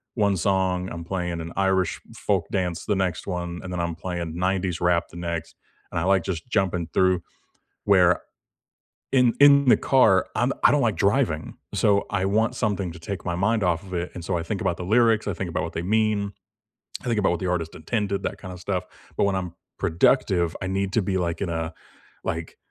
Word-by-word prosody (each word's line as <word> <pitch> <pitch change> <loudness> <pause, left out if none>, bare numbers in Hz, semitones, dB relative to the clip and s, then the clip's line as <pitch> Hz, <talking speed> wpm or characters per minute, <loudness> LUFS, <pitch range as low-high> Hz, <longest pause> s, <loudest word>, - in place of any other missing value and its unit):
one 100 -4 +2
song, 95 0 +1
I'm 85 0 -6
playing 90 -1 -3
an 80 +1 -6
Irish 95 -3 +1
folk - - 0
dance 90 -3 -1
the 105 - +1
next 95 -2 -1
one, 90 -2 -3
and 90 - -6
then 90 - -3
I'm 85 0 -1
playing 85 -1 -4
90s 90 -1 -1
rap 85 -1 +2
the 85 - -12
next, 85 -1 -4 0.4
and - - -1
I - - -1
like 95 -1 +3
just 95 +4 -4
jumping 95 -5 0
through, 95 -2 +3 0.6
where, 90 -3 +4 0.9
in 125 -3 +4
in 140 -1 +7
the - - +7
car, 110 -8 +4
I'm - - +1
I - - +8
don't - - +3
like - - +1
driving, - - +1 0.2
so 100 -1 +3
I 95 -2 0
want 110 +5 +2
something 100 -7 -1
to 80 - -11
take 95 +3 -6
my 85 -1 -1
mind 105 +3 +1
off 90 0 +1
of 95 -2 -7
it, 85 +1 -3
and 90 - -7
so 90 +1 -1
I 85 - -2
think 95 +3 -3
about 85 - 0
the 90 - -5
lyrics, 110 0 +3
I 100 - 0
think 90 0 -4
about 85 - -2
what 80 - -5
they 85 - -2
mean, 105 +1 +1 0.7
I - - -14
think 120 -2 0
about 95 - +2
what 85 - -1
the 95 - -2
artist 85 -2 -1
intended, 100 +3 -2
that - - -3
kinda 90 -1 -8
stuff, 90 0 -2 0.3
but - - +3
when 100 -1 +2
I'm 90 -3 -3 0.3
productive, 85 - +2
I 95 - -2
need 95 0 -1
to 115 - +3
be, 95 0 -1
like, 85 -2 -2
in 95 - -1
a 80 -1 -3 0.5
like, 80 0 -4
95 Hz, 215 wpm, -24 LUFS, 85-100 Hz, 0.9 s, I